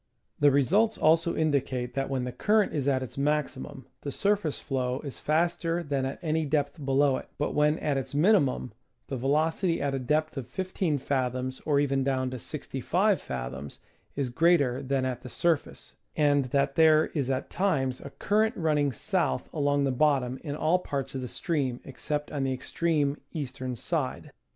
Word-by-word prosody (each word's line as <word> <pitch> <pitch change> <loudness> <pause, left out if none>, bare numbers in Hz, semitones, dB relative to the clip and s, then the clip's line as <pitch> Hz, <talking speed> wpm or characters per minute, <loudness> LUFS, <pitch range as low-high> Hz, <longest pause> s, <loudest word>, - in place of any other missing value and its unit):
The 145 - +6
results 190 - +3
also 165 +2 +3
indicate 130 -5 0
that 135 +1 -2
when 135 -2 -1
the 125 - -3
current 210 - +2
is 145 -3 -1
at 130 -2 +2
its 130 - -7
maximum 145 - -2 0.2
the 140 - -4
surface 200 -3 0
flow 130 -2 -2
is 140 -3 -6
faster 170 +2 0
than 140 -3 -1
at 135 - -5
any 160 0 +1
depth 145 0 -1
below 135 0 +3
it, - - -8
but 150 - -1
when 150 +1 +3
at 145 -2 -1
its 135 +1 -6
minimum 150 - +3 0.4
the 135 - -2
veloc 155 +7 +1
ity 170 -3 +2
at 140 -1 -1
a 135 - -1
depth 150 +4 0
of 130 -3 -4
15 185 0 -1
fathoms 130 -1 -2
or 145 -2 +3
even 135 -1 +1
down 130 -1 0
to 130 - -5
65 175 - 0
fathoms 65 +2 -6 0.4
is 135 -3 -1
greater 145 -4 +3
than 135 -1 0
at 125 -2 -3
the 125 - -9
surface, 165 +3 -1 0.2
and 145 -2 +3
that 140 +2 +1
there 155 0 +5
is 140 -5 -1
at 130 0 -2
times 135 -10 0
a 140 - -7
current 215 - +1
running 150 -4 +2
south 65 - -1
along 145 -2 +1
the 135 - +1
bottom 130 -2 +1
in 145 -3 -4
all 160 +4 +2
parts 135 -6 -4
of 135 - -3
the 125 - -4
stream 135 -5 -2
except 150 +2 -4
on 145 -3 -2
the 135 - 0
extreme 145 +2 -1
eastern 130 -4 -4
side. 145 +2 -3
140 Hz, 180 wpm, -28 LUFS, 130-155 Hz, 0.4 s, The